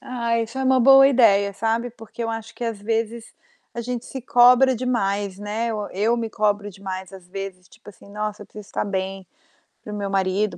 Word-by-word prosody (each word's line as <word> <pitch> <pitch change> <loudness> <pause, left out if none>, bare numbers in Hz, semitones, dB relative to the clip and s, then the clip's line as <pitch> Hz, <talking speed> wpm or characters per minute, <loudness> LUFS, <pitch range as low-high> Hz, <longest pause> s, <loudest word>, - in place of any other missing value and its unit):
Ai, 235 -2 -1
isso 230 +4 -6
é 265 - -1
uma 260 -1 +4
boa 270 +2 +8
ideia, 200 -6 +4
sabe. 225 +4 -1
Porque 225 0 -9
eu 230 - -2
acho 225 0 -6
que, 235 - -5
às 225 -3 -3
vezes, 225 +1 -3 0.4
a 235 - -5
gente 245 0 -4
se 265 - -6
cobra 250 +1 +5
demais, 200 -5 -1
né, 220 +3 -2
o 210 -1 -4
eu 220 +5 +1
me 225 -2 -3
cobro 205 -1 0
demais, 190 -1 -7
às 185 -2 -12
vezes, 190 -1 -7
tipo 220 -1 -18
assim: 200 - -18
"Nossa, 210 0 -4
eu - - -14
preciso 210 -2 -11
estar - - -2
bem, 190 -1 -4 0.6
para 210 - -8
o - - -4
meu 200 -1 -3
marido, 195 +2 0
215 Hz, 210 wpm, -23 LUFS, 200-235 Hz, 0.6 s, boa